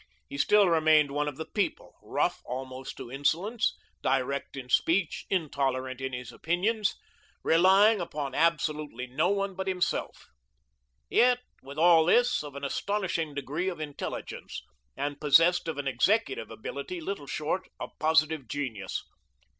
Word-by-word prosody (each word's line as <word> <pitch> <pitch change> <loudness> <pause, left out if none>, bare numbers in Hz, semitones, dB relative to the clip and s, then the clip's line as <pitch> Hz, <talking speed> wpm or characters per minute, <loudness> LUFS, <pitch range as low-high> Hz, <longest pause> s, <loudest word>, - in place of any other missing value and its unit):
He 140 - -7
still 205 +5 +5
remained 155 -3 +4
one 150 +1 -1
of 145 - -4
the 160 - -5
people, 205 -3 -2
rough - - -1
almost 130 +1 -6
to 120 - -8
insolence, 175 - 0 0.2
direct 135 +1 -1
in 130 -2 -7
speech, 165 +7 +1
intolerant 135 -7 -1
in 130 0 -3
his 125 -1 -6
opinions, 200 - 0 0.5
relying 190 +5 +5
upon 145 -5 -4
absolutely 150 -5 0
no 140 +8 0
one 200 -1 0
but 190 +1 -5
himself; 185 -2 -2 0.8
yet, 245 - +4 0.2
with 140 +2 -10
all 165 0 +6
this, 245 +3 +3
of 145 -2 -9
an 140 - -7
astonishing 170 -1 -2
degree 150 +6 -2
of 175 - -7
intelligence, 150 -2 -6 0.3
and 145 0 -3
possessed 165 +5 +5
of 160 - -3
an 145 -1 -3
executive 220 - +1
ability 400 -6 -6
little 195 - -5
short 155 +7 -2
of - - -6
positive 155 -3 +2
genius. 115 -7 -4
155 Hz, 140 wpm, -28 LUFS, 140-190 Hz, 0.8 s, all